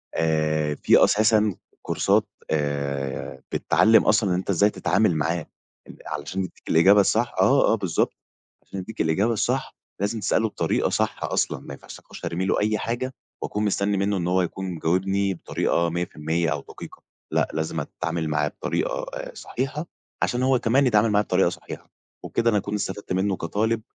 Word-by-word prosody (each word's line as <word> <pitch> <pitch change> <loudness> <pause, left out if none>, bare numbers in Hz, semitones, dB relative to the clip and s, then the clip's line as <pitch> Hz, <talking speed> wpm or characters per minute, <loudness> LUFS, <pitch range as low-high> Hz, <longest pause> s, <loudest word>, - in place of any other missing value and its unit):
آآ، 75 -2 +1
في - - +5
أساسًا 110 -2 +3 0.3
كورسات - - +1 0.2
آآ، 70 -3 -2
بتعلم 110 +1 +4
أصلًا 105 -2 +3
إن 90 - +2
أنت 95 +2 -4
إزاي 100 +3 +4
تتعامل 105 -3 +1
معاه 80 +3 0 0.5
آآ - - -11
علشان 75 +5 -4
يدّيك 90 - -10
الإجابة 95 +6 +6
الصح، 115 +5 +1
آه، 110 +4 +4
آه، - - +4
بالضبط، 95 -7 0 0.5
عشان 95 - -7
يدّيك 110 +4 -5
الإجابة 95 +9 +2
الصح 105 - -1 0.3
لازم 105 +3 -1
تسأله 110 +2 +1
بطريقة - - 0
صح - - -1
أصلًا، - - 0
ما - - -9
ينفعش - - -11
أخش - - -11
أرمي 90 +3 -2
له - - +1
أي 110 +1 +1
حاجة 120 +4 -3 0.3
واكون 105 +1 -2
مستنّي 100 0 +1
منّه 100 0 +1
إن 85 - -2
هو 90 +1 +2
يكون 95 +2 -3
مجاوبني 95 +4 0
بطريقة 85 0 0
100% 85 -1 -1
أو 70 -1 -2
دقيقة. - - -11 0.3
لأ، - - +2
لازم 80 +1 -2
اتعامل 85 +2 -3
معاه 75 -1 +1
بطريقة - - -2
آآ - - -6
صحيحة، 135 +5 -4 0.4
عشان 125 +1 0
هو 130 -2 +3
كمان 130 +4 +3
يتعامل 110 -1 +4
معايا 105 0 +3
بطريقة 90 -1 +3
صحيحة. - - -9 0.3
وكده 115 0 +1
أنا 105 - +2
أكون 100 - -3
استفدت 100 -1 -4
منّه 95 +1 +1
كطالب، 110 +6 -1
95 Hz, 170 wpm, -24 LUFS, 80-110 Hz, 0.5 s, الإجابة